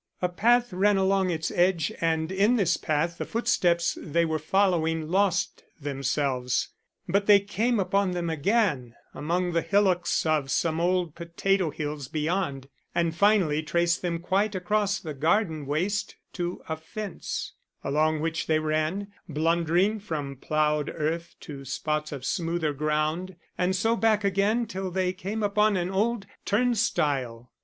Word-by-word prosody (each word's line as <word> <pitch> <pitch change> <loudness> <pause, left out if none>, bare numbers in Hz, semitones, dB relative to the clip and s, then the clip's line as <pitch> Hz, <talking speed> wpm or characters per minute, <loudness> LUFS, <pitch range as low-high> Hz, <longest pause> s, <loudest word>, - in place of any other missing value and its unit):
A 180 - 0
path 240 +4 +2
ran 200 +2 +3
along 190 -1 +2
its 160 -2 -2
edge 175 -3 +2
and 160 0 0
in 205 +6 +3
this 180 -7 +2
path 160 +3 -1
the - - -1
footsteps 175 -8 +1
they 170 +2 +1
were 160 -1 -1
following 165 -2 +1
lost 190 -1 +1 0.2
themselves; 135 -2 -1 0.4
but 200 +3 +1
they 205 -1 +8
came 220 +4 0
upon 195 +1 +1
them 175 -1 -2
again 160 - 0 0.2
among 175 +4 -1
the 165 0 +1
hillocks 190 -4 +2
of 155 -4 +1
some 160 +4 0
old 175 -2 +1
potato 170 +2 0
hills 150 -2 -5
beyond, 155 -3 -2 0.3
and 170 -1 +1
finally 185 -6 +3
traced 170 +2 +1
them 175 -2 -1
quite 195 +4 0
across 200 +2 0
the 155 -3 -6
garden 160 0 0
waste 185 +8 -1 0.2
to 175 -1 -4
a 160 - -2
fence, 205 +5 -6 0.3
along 155 +2 +1
which 165 0 -2
they 155 - +3
ran, 155 +5 -1 0.2
blundering 170 +6 +1
from 150 -8 -4
ploughed 150 +2 0
earth 165 +2 -3
to 140 -3 -8
spots 150 +3 -2
of 135 -3 -6
smoother 165 -3 -1
ground, 155 +5 -1 0.2
and 185 +1 +1
so 225 +5 +2
back 220 -2 +2
again 200 +4 +2
till 190 -2 -4
they 185 0 0
came 205 +3 -4
upon 210 0 +3
an 180 +1 -1
old 210 +2 0 0.2
turn 245 +4 +2
stile! 135 - -1
175 Hz, 150 wpm, -27 LUFS, 155-195 Hz, 0.4 s, they